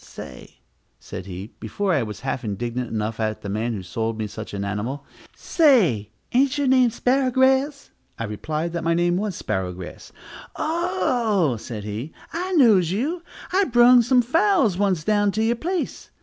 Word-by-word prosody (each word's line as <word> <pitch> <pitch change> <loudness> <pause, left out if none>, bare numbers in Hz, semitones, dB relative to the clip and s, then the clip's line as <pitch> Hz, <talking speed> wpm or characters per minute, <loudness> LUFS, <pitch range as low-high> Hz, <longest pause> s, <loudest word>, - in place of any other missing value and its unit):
Say," - - -11 0.4
said 90 - -8
he, 95 +3 -8
before 185 - -1
I 145 - +2
was 105 -2 -6
half 135 0 -3
indignant 120 +3 -3
enough 110 0 -3
at 110 -1 -2
the 100 - -5
man 110 +4 -1
who - - -3
had - - -13
sold 115 +2 -3
me 110 - -2
such 105 - -8
an 100 0 -3
animal, 115 +8 -4 0.3
"say, 205 - +3 0.2
ain't 270 +3 +3
your 285 - 0
name 255 -2 +4
Sparrowgrass?" 265 +3 +1 0.3
I - - -4
replied 155 +10 -3
that 170 - -3
my 165 0 +2
name 175 +1 +2
was 205 -2 -2
Sparrowgrass. 90 -1 -5 0.4
"Oh," 210 - 0
said 110 -1 -7
he, 110 +8 -6 0.2
"I 365 +3 -3
knows 215 - +5
you, 280 - -2 0.3
I 390 +1 +4
brung 240 -1 +6
some 245 +1 +3
fowls 330 - +2
once 185 -4 0
down 205 +1 +2
to 220 - 0
you 230 +1 +2
place. 345 +9 -4
180 Hz, 170 wpm, -23 LUFS, -, 0.4 s, brung